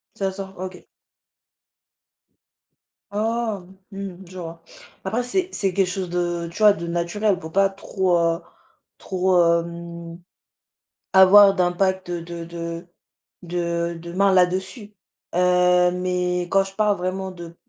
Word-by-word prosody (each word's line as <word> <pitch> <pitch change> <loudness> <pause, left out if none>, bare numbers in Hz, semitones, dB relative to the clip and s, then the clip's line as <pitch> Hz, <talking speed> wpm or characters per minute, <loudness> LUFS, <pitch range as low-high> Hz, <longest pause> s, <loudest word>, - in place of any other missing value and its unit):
Ça 195 -1 -1
sort? 195 0 -8
OK. 185 -1 -7 2.3
Ah 220 -1 -1 0.3
mmh, 195 -2 -7
je 185 +1 -11
vois. 165 -1 -8 0.4
Après, 225 +6 -1
c'est 365 +9 0
c'est 195 -3 0
quelque 195 -1 +2
chose 185 -1 -3
de 175 -1 -2
tu - - -11
vois, 210 -2 +6
de 170 -1 -6
naturel, 175 +4 0
pour 160 -3 -9
pas 195 0 +4
trop, 190 -2 0
heu, 170 +1 +1 0.6
trop, 185 -1 +1 0.2
hem, 170 0 -9 0.9
avoir 195 +1 +8
d'impact 185 0 0
de 170 -1 -5
de 170 +1 -6 0.6
de 170 -1 -2
de 170 0 -8
main 195 +1 +3
là-dessus, 190 +4 0 0.4
heu, 180 0 +4
mais 180 0 -1
quand 195 0 +4
je 195 0 -9
parle 210 -1 +2
vraiment 185 +1 -3
de 170 -2 -10
180 Hz, 130 wpm, -23 LUFS, 170-195 Hz, 2.3 s, avoir